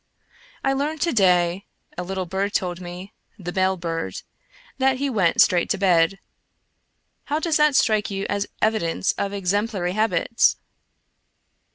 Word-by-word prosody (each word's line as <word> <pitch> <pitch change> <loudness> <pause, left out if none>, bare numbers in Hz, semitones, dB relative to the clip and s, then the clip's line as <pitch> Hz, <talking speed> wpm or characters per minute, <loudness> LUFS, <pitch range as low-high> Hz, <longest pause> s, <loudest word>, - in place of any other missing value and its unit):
I 270 - +2
learned 295 +3 -2
to 340 - +1
day 180 -3 +2 0.3
(a - - -4
little 185 +1 -3
bird 195 +3 -2
told 180 -1 -1
me 180 +3 -9
— - - -42
the 175 - -4
bell 190 0 +1
bird) 165 -1 -4 0.6
that 265 0 +2
he 275 +1 -1
went 190 -8 +1
straight 175 -1 +3
to 210 - +1
bed. 185 -1 +3 1.1
How 295 - -1
does 320 -1 +1
that 300 -2 +3
strike 215 -5 +2
you 195 0 -3
as 200 0 -2 0.2
evidence 205 -5 +1
of 200 - -3
exemplary 200 -1 -1
habits? 220 +3 +2
195 Hz, 150 wpm, -23 LUFS, 180-225 Hz, 1.1 s, straight